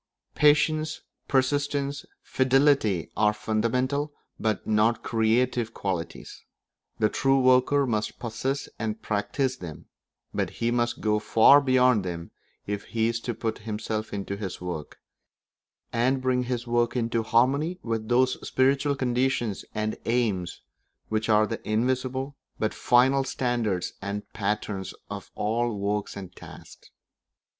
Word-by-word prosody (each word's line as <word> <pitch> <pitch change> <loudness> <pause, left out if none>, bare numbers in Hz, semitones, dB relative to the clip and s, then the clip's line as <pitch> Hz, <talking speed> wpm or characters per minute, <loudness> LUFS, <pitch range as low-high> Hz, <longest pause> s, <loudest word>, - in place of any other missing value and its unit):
Patience, 155 +1 +3 0.3
persistence, 140 +1 0 0.2
fidelity 130 - +2
are 105 0 +3
fundamental 125 +8 0 0.3
but 110 -3 -1
not 110 +2 +2
creative 115 +1 +1
qualities; 90 -4 -4 0.5
the 110 - +3
true 135 +5 +2
worker 130 +2 +4
must 110 -3 -2
possess 130 +4 -3
and 110 0 -2
practise 125 +5 -1
them; 80 -9 -9 0.5
but - - -1
he 115 0 0
must 120 0 0
go 105 -1 +2
far 115 +7 +6
beyond 130 -5 +4
them 85 -2 -5 0.3
if 100 0 -4
he 115 0 0
is 115 0 -2
to 120 0 -4
put 110 0 -3
himself 110 0 -4
into 100 -1 -4
his 100 -3 -5
work, 85 -4 -6 1.0
and 125 +3 +2
bring 130 -1 +1
his 120 -1 -2
work 120 0 +1
into 115 -1 0
harmony 135 +10 +2
with 115 -1 -3
those 125 +1 +3
spiritual 140 +2 +2
conditions 125 -4 0
and 110 0 -1
aims 110 -7 -1 0.5
which 110 0 -1
are 110 0 +5
the 115 +1 -5
invisible 130 +4 -1 0.2
but 110 - -1
final 130 +3 +4
standards 120 -8 -1
and 100 +1 -4
patterns 105 -2 -3 0.2
of - - -7
all 115 +1 0
works 100 +1 -2
and 95 -2 -9
tasks. - - -13
115 Hz, 130 wpm, -26 LUFS, 105-130 Hz, 1.0 s, far